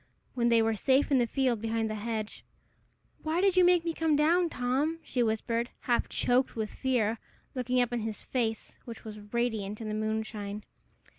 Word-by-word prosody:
When 235 -1 +2
they 230 -1 +5
were 225 0 +2
safe 265 +7 +2
in 270 - +5
the 240 - +2
field 250 -4 0
behind 225 0 0
the 215 - -3
hedge 215 0 -4 0.8
"Why 315 +2 0
did 385 -1 +3
you 365 - +6
make 355 -1 +4
me 335 - 0
come 320 -2 +1
down, 335 +4 +3
Tom?" 270 +5 0
she 255 - -1
whispered, 230 +1 0
half 240 -1 +1
choked 250 +2 +1
with 220 -2 -3
fear, 230 -4 0 0.3
looking 250 -1 0
up 245 0 +1
in 240 - 0
his 220 -1 -4
face, 225 -4 -3
which 230 -2 -9
was 215 -1 -7
radiant 220 -4 -1
in 220 -2 -5
the - - -2
moonshine. 215 -1 -3
235 Hz, 190 wpm, -30 LUFS, 220-265 Hz, 0.8 s, you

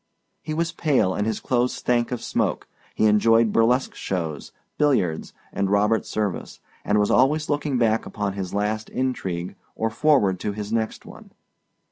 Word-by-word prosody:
He 155 - -4
was 165 +1 0
pale 135 - +1
and 105 +3 -1
his 110 - -1
clothes 125 0 0
stank 120 -1 0
of 125 - -4
smoke; - - -1 0.3
he - - +2
enjoyed 115 +1 +4
burlesque 125 +3 +2
shows, 80 -6 -4 0.3
billiards, 125 - +1 0.2
and 100 -1 0
Robert 105 +2 +2
Service, 105 -4 -3 0.2
and 105 - +1
was 105 0 +2
always 150 +5 +3
looking 145 -2 0
back 115 -2 +1
upon 100 -2 -3
his 95 -2 -5
last 105 +2 -2
intrigue 95 -9 -3 0.2
or 110 0 -1
forward 115 -8 +2
to 105 - -3
his 105 +1 -5
next 110 -1 -2
one. - - -13
110 Hz, 160 wpm, -23 LUFS, 100-125 Hz, 0.3 s, enjoyed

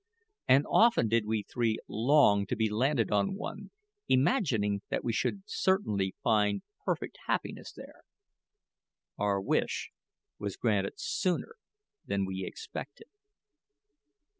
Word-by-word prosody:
And 135 +3 +5
often 230 - +4
did 115 -1 +2
we 110 -1 0
three 115 0 -1
long 110 -5 +4
to 125 - -1
be 110 -1 0
landed 120 0 +1
on 100 - +1
one, 205 - -6 0.4
imagining 130 - +2
that - - -2
we 115 - -1
should 195 - -1
certainly 150 - 0
find 105 -3 +2 0.2
perfect - - -3
happiness - - -2
there! - - -13 1.2
Our 100 -1 +1
wish 95 - -1 0.5
was 100 -2 -4
granted 100 -4 +1
sooner 185 - -1 0.5
than 100 -1 0
we 95 0 -4
expected. 450 0 -8
110 Hz, 115 wpm, -30 LUFS, 100-145 Hz, 1.2 s, And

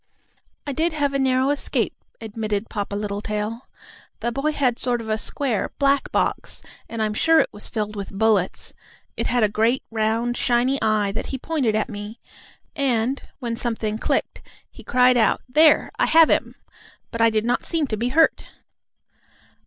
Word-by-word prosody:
"I 285 - -3
did 320 +4 0
have 290 -2 0
a 275 - 0
narrow 260 +1 +2
escape," 290 - 0 0.3
admitted 215 -1 -4
Papa 205 -2 -3
Littletail. 210 +3 -4 0.5
"The 235 +1 -1
boy 275 +5 -1
had 255 -5 +1
a - - -8
sort 245 -1 0
of 220 -1 -2
square, 245 -3 -1
black 280 -1 +1
box, - - -1 0.3
and 225 -1 -2
I'm 215 -1 -1
sure 325 +8 +4
it - - +2
was 205 - -4
filled 210 -1 -3
with 200 -1 -5
bullets. 205 -2 0 0.4
It - - -1
had 245 -2 +2
a - - +5
great, 225 +5 +1
round, 225 +2 0
shiny 250 +3 +1
eye, 215 -2 +1
that 205 - -4
he 265 - -4
pointed 260 -6 -1
at 215 - 0
me, 210 +2 -8 0.6
and, 260 -2 0 0.2
when 235 -3 -4
something 225 -2 -3
clicked, - - -1 0.3
he - - -14
cried 250 0 +4
out, 225 - +3
'There, 300 +4 +4
I - - +3
have 325 -1 +6
him!' - - 0 0.6
But 230 - -3
I 230 - +6
did 220 0 0
not 245 +1 0
seem 325 -3 0
to 230 - -3
be 235 +3 -1
hurt." 320 +5 +3
235 Hz, 175 wpm, -22 LUFS, 215-270 Hz, 0.6 s, have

